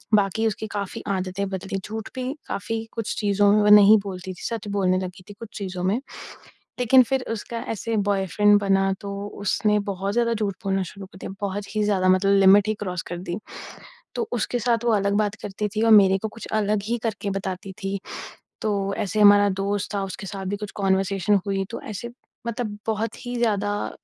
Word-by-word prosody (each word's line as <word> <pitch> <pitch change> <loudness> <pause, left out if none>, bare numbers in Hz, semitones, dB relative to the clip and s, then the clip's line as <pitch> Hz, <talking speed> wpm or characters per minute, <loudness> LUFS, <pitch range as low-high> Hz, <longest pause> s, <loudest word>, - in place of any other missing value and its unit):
बाकी 205 +2 +1
उसकी 220 +1 -3
काफ़ी 200 -2 -4
आदतें 190 +1 -2
बदली, 195 +1 -4
झूठ 220 0 -6
भी 255 +1 -3
काफ़ी 225 +2 -3
कुछ 230 -1 -3
चीज़ों 205 -1 +3
में 210 - +4
वो 210 - +4
नहीं 210 +1 +8
बोलती 185 -1 -6
थी, - - -14
सच 225 -3 -4
बोलने 185 -2 +2
लगी 185 0 -7
थी - - -8
कुछ 230 -2 -8
चीज़ों 185 -3 -4
में, 195 +5 +2 0.8
लेकिन 255 +2 +6
फिर 265 -1 +1
उसका 230 +1 -5 0.2
ऐसे 225 +2 -2
बॉयफ्रेंड 205 +1 +3
बना, 195 -1 +2
तो 200 0 -5
उसने 210 +1 +2
बहुत 195 +1 -2
ज़्यादा 235 -1 +2
झूठ 205 -3 -1
बोलना 195 0 +1
शुरू 195 +2 -8
कर 185 - -18
दिया, - - -7
बहुत 200 +1 -4
ही 210 - +2
ज़्यादा 190 -3 +2
मतलब 190 +2 +4
लिमिट 200 +2 +6
ही 215 - +1
क्रॉस 180 -2 -3
कर 175 - -4
दी। 175 +2 -4 0.8
तो 460 -2 -1
उसके 245 - -1
साथ 235 0 +1
वो 235 - +3
अलग 200 -1 +1
बात 205 0 -2
करती 205 +1 -3
थी 215 - +1
और 225 - +4
मेरे 195 -2 +7
को - - 0
कुछ 225 +2 -10
अलग 205 0 +1
ही 235 +2 0
करके 205 -2 -2
बताती 190 0 -5
थी, 195 +1 -1 0.7
तो 200 -2 0
ऐसे 215 0 -1
हमारा 205 0 +7
दोस्त 205 +1 -2
था 195 -1 0
उसके 195 +1 -7
साथ 195 0 -6
भी 205 +2 -2
कुछ 210 0 -6
कॉन्वर्सेशन 195 +1 +2
हुई 195 -1 0
तो 235 - -5
ऐसे 220 +3 -6 0.4
मतलब 220 -3 -3
बहुत 220 +3 -2
ही 245 - -3
ज़्यादा, 205 -3 0
205 Hz, 200 wpm, -24 LUFS, 195-215 Hz, 0.8 s, नहीं